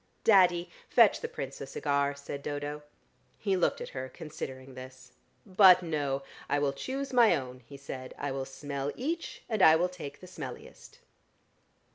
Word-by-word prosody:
"Daddy, 180 -4 +5 0.2
fetch 230 -4 +5
the - - -2
Prince 135 0 -7
a 135 - -5
cigar," 140 0 0
said 140 0 -7
Dodo. 145 +1 -4 0.6
He 200 -3 0
looked 180 - +1
at - - -5
her, 130 0 -6
considering 135 -4 -8
this. 130 0 -11 0.3
"But, 185 -2 +7
no; 145 -4 -2 0.3
I 145 - +2
will 145 -1 +1
choose 270 - -4
my 235 -7 +6
own," 130 -3 -6
he 140 - -10
said. 130 -2 -8
"I 145 -1 -3
will 135 0 -3
smell 140 +1 -4
each, 330 +7 -4
and 220 -4 -1
I 160 -3 +8
will 175 +3 +1
take 160 -6 -8
the - - -12
smelliest." 460 - -10
145 Hz, 165 wpm, -30 LUFS, 135-185 Hz, 0.6 s, I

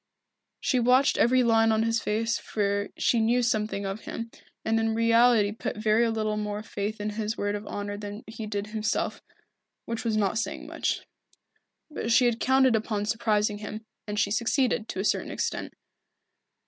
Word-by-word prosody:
She 255 - +1
watched 255 +4 +4
every 255 +2 +4
line 225 -1 +4
of 220 0 +2
his 230 0 +1
face 225 +2 0
for 200 -1 -1
she 235 - +2
knew 240 +3 +2
something 215 -3 0
of 195 +2 -3
him, 230 0 -5 0.3
and 225 0 +2
in 225 0 0
reality 230 -2 +4
put 215 - -5
very 220 +2 +3
little 215 -1 -1
more 210 0 -3
faith 210 0 -4
in 210 0 -2
his 215 +1 -3
word 205 0 -1
of 205 0 -5
honour 205 0 -4
than 205 +1 -7
he 220 0 -7
did 205 -1 -3
himself, 215 0 -2 0.6
which 230 -1 -4
was 225 -2 0
not 205 +1 +1
saying 230 - -4
much. - - -2 0.9
But 235 -6 -3
she 245 +2 +5
had 235 -1 +1
counted 265 -2 +4
upon 215 -1 -1
surprising 210 -1 +1
him, 215 +1 -7 0.2
and 210 0 -2
she 200 - +1
succeeded, 235 0 +1
to - - -4
a 195 - -1
certain - - 0
extent. - - -3
220 Hz, 175 wpm, -27 LUFS, 210-230 Hz, 0.9 s, she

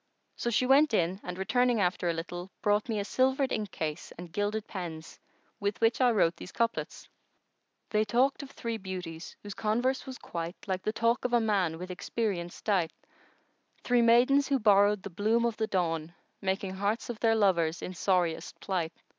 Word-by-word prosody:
So 240 - -2
she 235 +2 +2
went 270 -1 +5
in 180 +2 +1
and, 180 0 -6
returning 245 +4 +2
after 180 -2 +1
a - - +1
little, 175 +2 -6
brought 210 +3 +2
me 220 - 0
a 200 - -2
silvered 265 +3 +1
inkcase 160 -7 -3
and 175 0 -9
gilded 205 +2 -1
pens[FN#117] 165 -4 -7 0.4
with 205 0 -2
which 230 +3 +2
I 250 - +6
wrote 180 -7 +3
these 185 - -9
couplets:— 230 +2 -2 0.8
They 215 0 +3
talked 250 +7 +2
of 280 - -9
three 230 -4 -4
beauties 180 -4 -7
whose 205 -1 -6
converse 245 +7 0
was 260 -1 -6
quite 170 +1 -5
* - - -24
Like 190 -1 -1
the 215 - -1
talk 230 +2 +1
of 250 - -1
a 240 - +6
man 195 -7 +1
with 180 +2 -6
experience 180 -2 -3
dight: 185 -6 +1 0.9
Three 245 -1 +3
maidens 250 +4 +5
who 275 - +2
borrowed 205 -3 +4
the 200 - -6
bloom 220 +6 +2
of 235 -2 -1
the 220 - 0
dawn 165 -3 -1
* - - -45
Making 190 0 -1
hearts 205 +5 -1
of 230 - -9
their 225 -1 +3
lovers 170 -6 +2
in 185 - -4
sorriest 180 -3 0
plight. 175 -4 -2
205 Hz, 190 wpm, -30 LUFS, 180-235 Hz, 0.9 s, I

